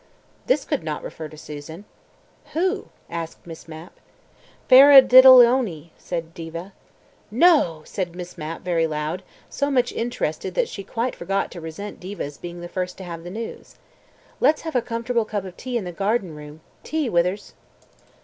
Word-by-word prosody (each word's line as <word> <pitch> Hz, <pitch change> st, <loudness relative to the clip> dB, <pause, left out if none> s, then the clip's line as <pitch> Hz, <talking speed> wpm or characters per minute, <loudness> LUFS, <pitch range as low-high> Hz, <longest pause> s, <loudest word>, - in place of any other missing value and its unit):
This 270 Hz, +2 st, +2 dB
could -, -, -1 dB
not 155 Hz, -2 st, -4 dB
refer 160 Hz, -, -7 dB
to 155 Hz, -, -14 dB
Susan.... 155 Hz, +5 st, -9 dB, 0.7 s
"Who?" 370 Hz, +5 st, -1 dB, 0.2 s
asked 165 Hz, -1 st, -7 dB
Miss 165 Hz, -1 st, -11 dB
Mapp. 160 Hz, +2 st, -11 dB, 0.7 s
"Faradiddleony," 255 Hz, -, +8 dB
said 165 Hz, -2 st, -6 dB
Diva. 170 Hz, +3 st, -8 dB, 0.6 s
"No!" 230 Hz, -, +3 dB
said 175 Hz, -3 st, -4 dB
Miss 180 Hz, 0 st, -8 dB
Mapp 155 Hz, +2 st, -6 dB
very 170 Hz, -2 st, +1 dB
loud, 155 Hz, +3 st, -3 dB, 0.3 s
so 280 Hz, +1 st, -2 dB
much 250 Hz, -3 st, +1 dB
interested 235 Hz, +1 st, -3 dB
that -, -, +1 dB
she 195 Hz, -, -7 dB
quite 230 Hz, +5 st, -3 dB
forgot 195 Hz, +3 st, -2 dB
to 175 Hz, -, -9 dB
resent 165 Hz, +6 st, -7 dB
Diva's 180 Hz, -6 st, -7 dB
being 175 Hz, 0 st, -8 dB
the 175 Hz, -, -6 dB
first 180 Hz, 0 st, -4 dB
to 190 Hz, -, -8 dB
have 170 Hz, -2 st, -7 dB
the 175 Hz, -, -7 dB
news. 220 Hz, +4 st, -8 dB, 0.6 s
"Let's 305 Hz, +1 st, +3 dB
have 320 Hz, -3 st, -6 dB
a 250 Hz, -, +3 dB
comfortable 230 Hz, +1 st, -1 dB
cup 205 Hz, -2 st, -4 dB
of 185 Hz, -1 st, -9 dB
tea 250 Hz, -1 st, -4 dB
in 225 Hz, -, -3 dB
the 180 Hz, -, -5 dB
garden 195 Hz, 0 st, -1 dB
room. 150 Hz, +1 st, -11 dB, 0.2 s
Tea, 310 Hz, -3 st, -2 dB
Withers." 180 Hz, 0 st, 0 dB
185 Hz, 160 wpm, -23 LUFS, 165-245 Hz, 0.7 s, Faradiddleony